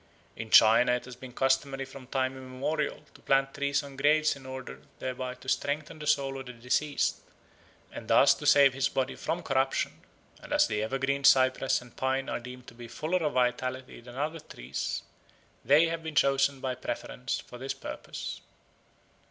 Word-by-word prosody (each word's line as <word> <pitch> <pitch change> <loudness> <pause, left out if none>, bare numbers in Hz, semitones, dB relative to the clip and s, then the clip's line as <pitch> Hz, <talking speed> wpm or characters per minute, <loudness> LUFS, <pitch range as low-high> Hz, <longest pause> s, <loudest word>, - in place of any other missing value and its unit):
In 115 0 -7
China 115 +3 +7
it 125 - -2
has 125 -1 -10
been 125 0 -10
customary 135 +1 0
from 135 -1 -12
time 130 0 -1
immemorial 135 +4 -3
to - - -18
plant 135 0 +2
trees 140 +1 0
on 140 -1 -10
graves 155 +2 +3
in 135 -1 -12
order 130 -1 -8 0.2
thereby 130 0 -4
to 130 - -16
strengthen 150 +3 -2
the 150 - -6
soul 135 -2 +1
of 135 - -9
the 125 - -7
deceased 125 +5 0 0.7
and - - -9
thus - - +6
to 145 - -5
save 140 -3 +7
his 135 0 0
body 130 -1 -1
from 175 +2 -3
corruption; 135 -2 0 0.4
and - - -6
as - - +5
the 105 -1 -2
evergreen 135 +4 -1
cypress 130 -1 +4
and 125 - -18
pine 130 +1 -1
are - - -2
deemed 125 +1 -10
to 120 - -12
be 120 0 -10
fuller 160 +9 -1
of 155 -3 -1
vitality 125 0 -1
than 120 +1 -12
other 155 +4 -2
trees, 65 - -5 0.6
they 145 +6 +5
have 165 0 -3
been 160 -2 -6
chosen 135 -1 +3
by 130 -1 -2
preference 125 0 -4
for 125 - -11
this 135 +1 -4
purpose. - - -7
135 Hz, 180 wpm, -29 LUFS, 125-140 Hz, 0.7 s, China